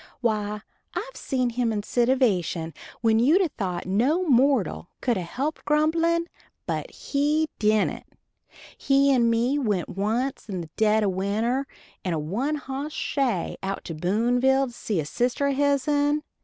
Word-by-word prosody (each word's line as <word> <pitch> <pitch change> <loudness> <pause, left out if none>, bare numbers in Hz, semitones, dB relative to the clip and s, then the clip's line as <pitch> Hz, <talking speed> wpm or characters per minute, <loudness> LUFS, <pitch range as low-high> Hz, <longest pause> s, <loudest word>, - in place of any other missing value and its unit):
Why 210 -3 -1 0.3
I've - - -4
seen 255 -2 -1
him 235 -1 0
in 210 -2 -2
sitivation 210 - +1 0.3
when 225 -1 +3
you'd 295 +10 +5
a 345 - 0
thought 185 -9 -4
no 250 - +2
mortal 260 - +2
could 245 -2 +1
a 185 - -2
helped 270 - -3
grumblin'; 330 +3 +2 0.4
but - - -3
he 300 +2 0
dident. 215 -1 +1 0.7
He 275 0 +3
and 235 -2 +3
me 240 +5 +1
went 205 -9 -1
once 225 +6 -2
in 185 -3 -3
the 160 -2 -10
dead 220 0 +3
of 200 - +2
winter 220 +8 -1 0.4
in 180 - -1
a - - -1
one 225 - -1
hoss 285 +1 -5
shay 250 - -1
out 195 0 -3
to 165 - -6
Boonville 245 +10 +2
to 245 - -9
see 210 -5 -2
a 155 - -2
sister 245 - 0
o' - - +1
hisen. 290 +1 +2
245 Hz, 155 wpm, -25 LUFS, 205-280 Hz, 0.7 s, you'd